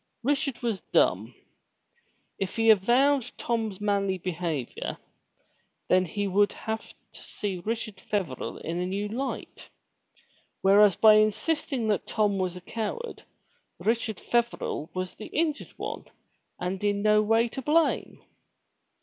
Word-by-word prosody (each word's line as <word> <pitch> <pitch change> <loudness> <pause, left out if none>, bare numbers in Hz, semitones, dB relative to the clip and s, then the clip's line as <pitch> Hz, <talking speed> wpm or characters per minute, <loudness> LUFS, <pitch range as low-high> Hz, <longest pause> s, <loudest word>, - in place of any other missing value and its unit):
Richard 275 -1 0
was 225 -5 -1
dumb. - - +2 1.0
If 195 - -3
he 225 -1 +6
avowed 245 +5 +3
Tom's 225 -5 -2
manly 200 -2 0
behavior, 165 -7 -3 0.9
then 185 0 +4
he 200 +4 -2
would 205 +1 +3
have 220 0 -5 0.2
to - - -11
see 190 -4 -4
Richard 225 -1 -3
Feverel 185 -13 -3
in 170 +2 -2
a 180 - -1
new 200 +2 -2
light. 260 +5 -5 0.9
Whereas, 200 0 +6
by 215 -1 +7
insisting 235 +3 +1
that 205 - 0
Tom 205 -2 +1
was 180 -1 -1
a - - -9
coward 230 - -5 0.6
Richard 225 -2 -1
Feverel 235 -9 -1
was 185 0 -3
the 215 - -9
injured 310 -2 -1
one - - -5 0.5
and 185 +2 -3
in 205 0 +1
no 215 0 +5
way 225 +2 +3
to 265 - -6
blame. 310 +4 +1
210 Hz, 130 wpm, -27 LUFS, 190-235 Hz, 1.0 s, by